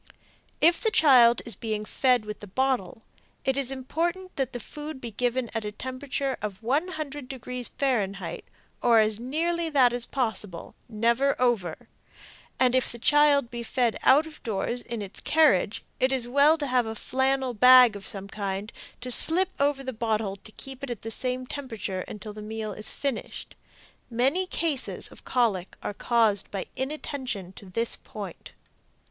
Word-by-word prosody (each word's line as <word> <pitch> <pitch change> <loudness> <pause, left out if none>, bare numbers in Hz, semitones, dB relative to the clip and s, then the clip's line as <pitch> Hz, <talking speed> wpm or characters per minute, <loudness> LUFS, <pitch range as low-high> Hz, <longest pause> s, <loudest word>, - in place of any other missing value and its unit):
If 335 +2 +5
the 450 - +2
child 250 - +6
is 235 - +1
being 215 -2 -4
fed 250 0 +2
with 210 0 -6
the 205 - -9
bottle 225 -2 -1 0.4
it 265 - +2
is 275 -2 -1
important 340 +8 -3
that 265 -2 -1
the 245 - -5
food 295 +5 -7
be 235 -3 -7
given 245 +2 -1
at 225 -1 -2
a 210 - -4
temperature 260 +3 -3
of 210 0 -5
100 295 +1 -2
deg. 260 -2 -9 0.3
F., 200 -9 -1 0.4
or 235 -1 +5
as 215 -1 +3
nearly 330 +7 -1
that 260 -5 +4
as 245 -1 -2
possible; 220 -9 -3 0.2
never 235 +5 +1
over; 225 -10 0 0.7
and 255 -1 +4
if 255 0 +1
the 235 - -6
child 285 0 +4
be 240 -1 -5
fed 235 0 0
out 290 +4 +5
of 315 -1 -12
doors 230 +2 -2
in 235 -3 -5
its 195 - -8
carriage 285 - +3 0.2
it 260 +1 +2
is 255 -3 +2
well 285 +5 +5
to 295 - -3
have 250 -3 +1
a 220 - -4
flannel 265 +2 0
bag 250 0 +8
of 200 -1 -6
some 195 -1 -3
kind 200 0 -4 0.3
to 250 0 0
slip 355 +9 +6
over 280 -1 +1
the 260 -1 -4
bottle 220 -3 -1
to 215 - -14
keep 270 0 -9
it 275 - -4
at 240 -4 -6
the 225 - -5
same 255 +2 -3
temperature 225 -9 -5
until 210 0 -8
the 210 - -9
meal 215 0 -5
is 215 +2 -4
finished. 275 -4 -5 0.6
Many 270 +11 +1
cases 315 -7 -1
of - - -15
colic 215 -8 0
are - - -3
caused 220 -2 +1
by 195 -2 -4
inattention 260 -8 -4
to 195 - -12
this 230 +5 0
point. - - -9
245 Hz, 170 wpm, -26 LUFS, 215-275 Hz, 0.7 s, bag